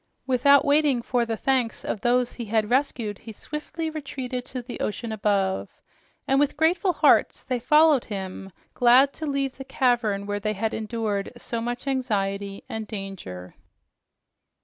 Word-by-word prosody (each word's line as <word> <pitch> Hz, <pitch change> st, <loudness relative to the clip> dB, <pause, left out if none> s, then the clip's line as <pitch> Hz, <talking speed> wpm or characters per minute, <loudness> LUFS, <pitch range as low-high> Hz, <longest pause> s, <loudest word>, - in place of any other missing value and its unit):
Without 270 Hz, +2 st, +5 dB
waiting 285 Hz, -4 st, +3 dB
for 240 Hz, -1 st, 0 dB
the 225 Hz, -1 st, -2 dB
thanks 255 Hz, -3 st, 0 dB
of 205 Hz, -, -3 dB
those 245 Hz, 0 st, +2 dB
he 235 Hz, -, -6 dB
had 215 Hz, +1 st, 0 dB
rescued, 245 Hz, -6 st, 0 dB
he 225 Hz, -, -10 dB
swiftly 300 Hz, +7 st, -5 dB
retreated 265 Hz, -5 st, -5 dB
to 255 Hz, -, -6 dB
the 245 Hz, -, -8 dB
ocean 225 Hz, +2 st, -3 dB
above, 200 Hz, -3 st, 0 dB, 0.6 s
and 270 Hz, 0 st, +3 dB
with 290 Hz, 0 st, +1 dB
grateful 350 Hz, +5 st, +2 dB
hearts -, -, +3 dB
they 255 Hz, -2 st, -2 dB
followed 300 Hz, +1 st, +4 dB
him, 195 Hz, -1 st, -6 dB, 0.2 s
glad 250 Hz, +3 st, +5 dB
to 315 Hz, -, -5 dB
leave 275 Hz, -2 st, -1 dB
the 270 Hz, -, -6 dB
cavern 240 Hz, -6 st, +1 dB
where 205 Hz, 0 st, -2 dB
they 215 Hz, +1 st, -1 dB
had 220 Hz, +2 st, -2 dB
endured 215 Hz, -2 st, -2 dB
so 235 Hz, -1 st, -4 dB
much 240 Hz, +2 st, -4 dB
anxiety 200 Hz, -7 st, -2 dB
and 220 Hz, -1 st, -5 dB
danger. 190 Hz, -, -7 dB
240 Hz, 155 wpm, -25 LUFS, 210-270 Hz, 0.6 s, Without